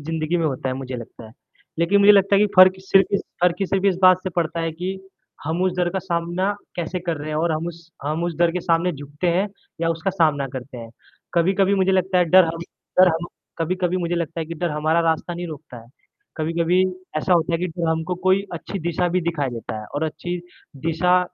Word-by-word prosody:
ज़िंदगी 160 +2 -2
में 165 - 0
होता 135 -2 -2
है, 130 - -1
मुझे 130 -1 -5
लगता 115 -1 -10
है, 110 - -15 0.5
लेकिन 185 +5 +3
मुझे 200 +1 +8
लगता 200 0 +4
है - - +4
कि 210 - +5
फ़र्क़ 185 0 +8
सिर्फ़ 195 0 +3
इस 200 - +2 0.2
फ़र्क़ 180 +1 +2
सिर्फ़ 195 +1 0
इस 190 -3 +3
बात 185 0 +6
से 185 - -3
पड़ता 170 0 0
है 165 0 -1
कि 185 +4 -4 0.5
हम 160 +4 -1
उस 185 -1 +2
डर 175 -1 +2
का 190 - -1
सामना 175 +2 -1 0.2
कैसे 175 +1 -3
कर 170 -2 0
रहे 150 +1 -6
हैं 155 - -2
और 165 +1 +1
हम 155 +2 -2
उस 170 0 -12
हम 155 +3 -1
उस 175 -1 -2
डर 170 -1 +4
के 180 - -2
सामने 170 +1 +1
झुकते 145 +3 -5
हैं 180 +4 +2 0.3
या 165 - +1
उसका 165 +4 -1
सामना 155 -6 +1
करते 130 -1 -7
हैं। 115 -1 -9 0.4
कभी-कभी 190 +3 +3
मुझे 190 -1 +2
लगता 185 0 +2
है 180 - +4
डर 185 +2 +6
हम 165 0 -4 0.4
डर 185 - +8
हम 165 +2 -3 0.3
कभी-कभी 180 +2 0
मुझे 175 -1 -1
लगता 170 -1 -3
है 160 - -4
कि 170 - -6
डर 170 +1 -2
हमारा 155 +2 +1
रास्ता 160 +2 -1
नहीं 175 +1 -5
रोकता 150 -5 -9
है, 115 - -19 0.5
कभी-कभी 170 +3 +1 0.4
ऐसा 185 +4 0
होता 170 -1 +2
है 165 - +1
कि 180 - -1
डर 170 -1 -3
हमको 160 +2 -1
कोई 190 +1 +4
अच्छी 175 +3 -5
दिशा 175 +1 0
भी 180 +1 +1
दिखा 165 -4 -1
देता 115 -2 -6
है 105 - -9
और 145 +2 0
अच्छी 160 +3 -4 0.5
दिशा 180 +3 +3
170 Hz, 235 wpm, -22 LUFS, 160-185 Hz, 0.5 s, मुझे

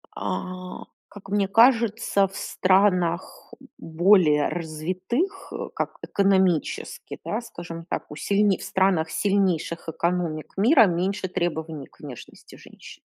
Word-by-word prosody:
А, 185 0 -5 0.3
как 195 -1 -13
мне 200 -1 +1
кажется, 225 -3 +3
в 195 - -14
странах 185 -3 +1 0.2
более 165 -3 +3
развитых, 185 - -3
э, - - -5
как - - -3
экономически, 190 -5 0
да, 220 +3 -2
скажем 170 -7 -9
так, 170 - -5
у - - -7
сильне 200 +5 +2
в - - -10
странах 185 -4 +1
сильнейших 175 -2 0
экономик 170 -2 -2
мира 230 +3 +6
меньше 185 +3 -1
требований 160 -4 -3
к - - -28
внешности 140 -5 -11
женщин. - - -14
185 Hz, 120 wpm, -24 LUFS, 165-200 Hz, 0.3 s, мира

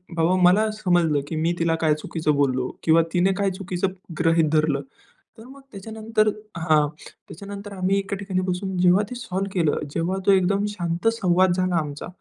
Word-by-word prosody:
बाबा 165 +3 +2
मला 210 +5 +5
समजलं, 175 -8 +1
की 160 - -5
मी 165 +2 0
तिला 165 -1 +1
काय 155 -1 +3
चुकीचं 155 -1 -2
बोललो 130 -3 0
किंवा 165 +1 +5
तिने 180 +2 +3
काय 200 -1 +1
चुकीचं 185 0 -3 0.3
गृहीत 165 -2 +3
धरलं. 155 -3 +1 0.6
तर 225 - -12
मग 270 +2 -14
त्याच्यानंतर 220 +2 -2 0.3
हां 155 -2 +3 0.2
त्याच्यानंतर 200 +3 -10
आम्ही 190 +1 0
एका 200 0 -4
ठिकाणी 190 -2 -2
बसून 185 +1 -3
जेव्हा 180 +3 +4
ते 250 - -6
सॉल्व्ह 195 -4 -4
केलं, 165 -5 +1
जेव्हा 175 +3 -1
तो 200 - +5
एकदम 195 +2 +2
शांत 175 0 -3
संवाद 185 -3 +2
झाला 185 -1 0
आमचा, 150 -3 -3
180 Hz, 170 wpm, -23 LUFS, 165-195 Hz, 0.6 s, मला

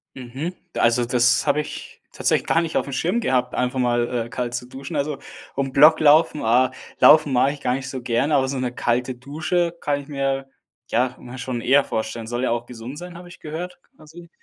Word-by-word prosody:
Mhm. 130 +7 -5 0.2
Also, 120 +1 +3
das 125 +1 +3
habe 145 +1 +3
ich - - -9
tatsächlich - - 0
gar 165 - +3
nicht 165 -1 -2
auf - - 0
dem 140 - -7
Schirm 175 - 0
gehabt, 125 - 0
einfach 125 +1 -1
mal, 120 -1 0
äh, - - -15
kalt 125 -1 -3
zu 125 - -4
duschen. 135 +5 -8
Also, 145 0 -2 0.4
um 135 -1 -1
Block 150 +4 +6
laufen, 155 0 +4
ah 125 +3 +3 0.3
Laufen 155 -3 +6
mache 130 +2 +3
ich 145 -1 -9
gar 125 - 0
nicht 130 -1 -5
so 130 -1 -5
gerne, 120 +5 +1
aber 135 -1 +2
so 135 +1 -3
'ne 125 -1 -2
kalte 125 +1 -1
Dusche 160 +7 -2
kann 145 -1 -1
ich 140 - -15
mir, 135 -1 -2 0.4
ja 125 +2 +1
ja, 125 +1 -10
schon 125 -1 -4
eher 140 +4 +4
vorstellen. 110 -1 -4
Soll 120 +2 -3
ja 130 - +1
auch 120 0 -2
gesund 120 +3 -9
sein, 180 +1 -9
habe 175 0 -11
ich 175 - -14
gehört, 170 +4 -6 0.2
quasi? 160 +2 -14
135 Hz, 215 wpm, -22 LUFS, 125-150 Hz, 0.4 s, Block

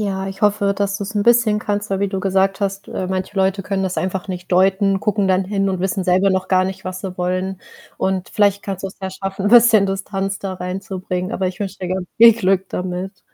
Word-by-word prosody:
Ja, 195 -2 -2
ich 195 +2 -9
hoffe, 205 -1 +2
dass 200 0 -1
du's 205 +2 -5
'n 205 - +1
bisschen 235 -3 +4
kannst. 205 -1 -3
Weil 195 - 0
wie 200 - +1
du 190 -1 -3
gesagt 195 +1 +1
hast, 195 0 -2
äh, 185 - -4
manche 190 +2 -3
Leute 195 0 +1
können 195 -1 -1
das 185 -1 -2
einfach 190 +1 -3
nicht 180 0 -6
deuten, 195 +1 +3
gucken 205 -2 0
dann 185 0 +2
hin 195 0 0
und 185 -2 -2
wissen 190 0 -1
selber 185 +2 +3
noch 190 0 0
gar 185 -1 +3
nicht, 190 0 -4
was 185 0 -5
sie 185 -2 -7
wollen. 185 +1 -2 0.4
Und 190 -1 -1
vielleicht 205 -2 +2
kannst 195 -1 -5
du's 190 - -6
ja 190 - -3
schaffen, 195 +1 -4
'n - - +4
bisschen 230 -4 +7
Distanz 195 0 -3
da 195 -1 -4
reinzubringen, 185 +1 -4
aber 190 -4 0
ich 180 - -8
wünsche 200 -1 -5
dir 180 - -3
ganz 185 0 -2
viel 230 0 +9
Glück 195 -3 0
damit. 180 +1 -4
195 Hz, 235 wpm, -19 LUFS, 185-200 Hz, 0.4 s, viel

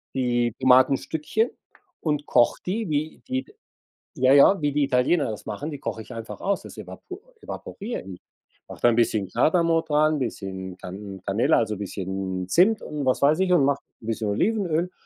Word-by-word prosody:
die 120 -3 +1
Tomatenstückchen 135 - +3 0.5
und 150 -2 -1
koche 120 - +3
die, 210 +4 -2
wie 155 +1 -2
die 260 +1 -2 0.7
ja 130 0 +4
ja, 155 +6 +6
wie 145 -1 0
die 145 0 +2
Italiener 135 +3 +2
das 105 - -8
machen, 145 +9 -5
die 145 - -7
koche 115 - -4
ich 115 - -10
einfach 115 -1 -8
aus. 200 0 -1
Das - - -11
evapo 370 +2 -9 0.2
evaporiere 220 +4 -6
ich. 95 -2 -10 0.5
Mache - - -11
da 120 - +6
'n 115 - +2
bisschen 110 -5 +1
Kardamom 165 - +2
dran, 155 0 +2
bisschen 95 -6 -5
Can 95 +1 -8
Canela, 100 +4 +3
also, 110 -3 -1
bisschen 95 -2 -4
Zimt 205 - +4
und 150 -2 -5
was 130 - +1
weiß 150 +4 +4
ich 190 -1 +2
und 165 -6 +5
mache 140 0 +1 0.2
'n 110 - -11
bisschen 110 -2 -2
Olivenöl, 180 - 0
135 Hz, 175 wpm, -24 LUFS, 110-165 Hz, 0.7 s, ja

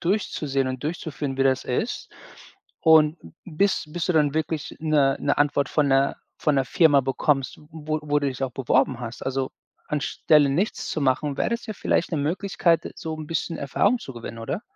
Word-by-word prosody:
durchzusehen 150 -8 0
und 130 +1 -5
durchzuführen, 150 -4 -4
wie - - +4
das 130 -1 +2
ist. 175 - -3 0.7
Und 160 -1 +5
b 80 - -12 0.2
bis 190 +4 +1
bis 170 +2 -3
du 180 - +2
dann 150 -3 +2
wirklich 155 -1 -2
'ne 150 -4 +3
'ne 145 - +1
Antwort 145 -2 +2
von 150 -2 +2
'ner 135 0 +2 0.2
von 150 -2 +1
'ner 135 -1 +1
Firma 150 -4 +5
bekommst, 135 0 0
w - - -17
wo 155 -1 -3
wo 145 -1 +1
du 145 - -1
dich 130 0 -5
auch 130 -2 -2
beworben 130 0 +1
hast. 120 -1 -7
Also, 135 0 -2 0.4
anstelle 150 0 +2
nichts 180 +10 -1
zu 155 - -2
machen, 140 +1 +1
wäre - - +1
das 235 0 -2
ja 215 - -4
vielleicht 180 - 0
'ne 160 - 0
Möglichkeit, 170 +2 0
so 160 -1 -5
'n 155 -1 -7
bisschen 165 +1 -2
Erfahrung 200 - +1
zu 135 - -9
gewinnen, 115 -1 -8
oder? 135 - -4
145 Hz, 195 wpm, -24 LUFS, 135-160 Hz, 0.7 s, Und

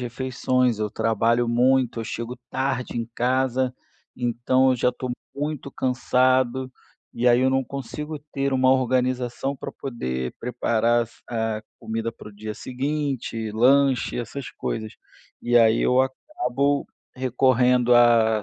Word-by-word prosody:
refeições, 125 -1 0
eu 105 -1 -2
trabalho 115 +2 +1
muito, 125 0 +2
eu 115 - -3
chego 115 +3 -5
tarde 130 -2 -2
em 115 -1 -3
casa, 130 0 +1 0.4
então, 125 +2 +2
eu 130 - +2
já 125 - +2
estou 125 +1 -6 0.2
muito 145 -1 -4
cansado. 130 0 +1 0.4
E 120 +1 -1
aí, 120 0 +5
eu 130 - +3
não 135 0 +1
consigo 150 +4 -6
ter 140 0 -1
uma 130 0 +4
organização, 130 +1 0
pra - - -7
poder 65 - -4
preparar 120 -1 +1
as 115 - -18 0.2
a 110 -2 -2 0.2
comida 115 +1 -3
para - - -12
o - - -13
dia 105 +1 -6
seguinte, 130 -4 -3
lanche, 130 +4 +3
essas 125 +3 -6
coisas. 110 -1 -4 0.5
E 120 0 +2
aí 115 -1 +5
eu 125 +1 +3
acabo 140 - -1 0.3
recorrendo 125 -1 +3
a 115 -2 +5
125 Hz, 135 wpm, -24 LUFS, 115-130 Hz, 0.5 s, aí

